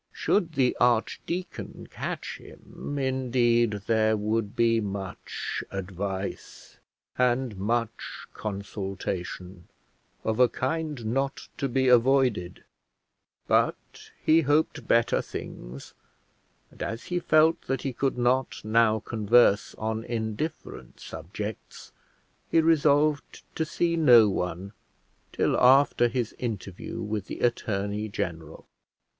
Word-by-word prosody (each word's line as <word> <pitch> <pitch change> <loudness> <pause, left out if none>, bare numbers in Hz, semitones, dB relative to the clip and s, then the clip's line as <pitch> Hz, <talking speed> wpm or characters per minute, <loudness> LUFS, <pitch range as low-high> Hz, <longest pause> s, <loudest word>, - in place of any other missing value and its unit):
Should 170 -5 0
the 130 -4 +2
archdeacon 165 +9 -1
catch - - -5
him, 145 - -9
indeed, 120 -5 +1
there 110 -1 +2
would 105 0 -1
be 115 -1 +3
much 100 -2 -5
advice, 95 0 -6 0.4
and 125 -2 +1
much 115 +3 -3
consultation 95 -3 -5 0.6
of 110 +1 -1
a 125 -1 +6
kind 145 0 -3
not 135 +1 -2
to 140 - -1
be 130 +1 +1
avoided; 125 -7 +3 0.8
but - - 0 0.2
he 160 +1 +5
hoped 150 +1 +1
better 115 0 +3
things; 60 +3 -8 0.8
and - - -15
as 115 - -4
he 180 0 -2
felt 160 0 +4
that 135 -1 -1
he 135 - -2
could 135 +1 -1
not 125 -1 0
now 110 0 +3
converse 110 -1 +3
on 110 +1 -3
indifferent 115 +7 -5
subjects, 100 +6 -7 0.6
he 165 - +4
resolved 150 -2 +2
to 160 - -1
see 170 +2 0
no 125 -9 +7
one 95 +1 -3 0.6
till - - +1
after 130 -1 +5
his 120 -1 -2
interview 105 -3 -5
with 105 -1 -3
the - - -7
attorney 105 -2 -1
general. 85 -5 -5
115 Hz, 110 wpm, -27 LUFS, 105-135 Hz, 0.8 s, no